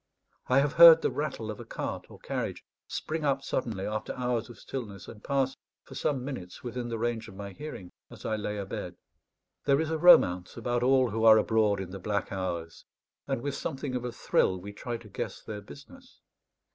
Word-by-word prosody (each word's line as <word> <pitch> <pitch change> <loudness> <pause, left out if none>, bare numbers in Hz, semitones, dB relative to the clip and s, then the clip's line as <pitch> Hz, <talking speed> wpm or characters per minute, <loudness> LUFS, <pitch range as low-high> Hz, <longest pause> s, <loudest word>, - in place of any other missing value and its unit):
I 130 +2 +5
have 145 0 0
heard 165 -1 +11
the - - +2
rattle 135 -7 -3
of 105 - -9
a - - -6
cart - - -5
or - - -12
carriage - - -4 0.2
spring 160 0 -3
up 135 -1 +1
suddenly 110 -9 -2
after 110 0 -3
hours 125 -2 -1
of 120 - -11
stillness, 105 -8 -7
and 105 -2 -11
pass, 135 -2 0 0.3
for - - -13
some 130 -4 -1
minutes, 95 -11 -7
within 120 0 -4
the 115 - -2
range 115 0 -2
of 100 - -12
my 100 0 -7
hearing 145 -10 -8 0.2
as - - -12
I 110 - 0
lay 105 0 -3
abed. 100 -1 -5 0.7
There 140 0 +4
is 160 0 -1
a 160 - -1
romance 90 - +6
about 120 +1 -1
all 130 -1 +4
who 110 +2 -1
are 110 -1 +9
abroad 110 -2 +2
in 95 -1 -5
the 100 - -6
black 100 +1 -2
hours, 85 -4 -4 0.4
and 120 - -2
with 145 - -2
something 135 -1 -4
of 125 -1 -2
a 125 - -3
thrill 95 -4 +1
we 100 +3 -8
try 120 +3 -4
to 115 - -14
guess 100 - -5
their 105 -1 -6
business. 250 - -14
115 Hz, 205 wpm, -29 LUFS, 100-135 Hz, 0.7 s, heard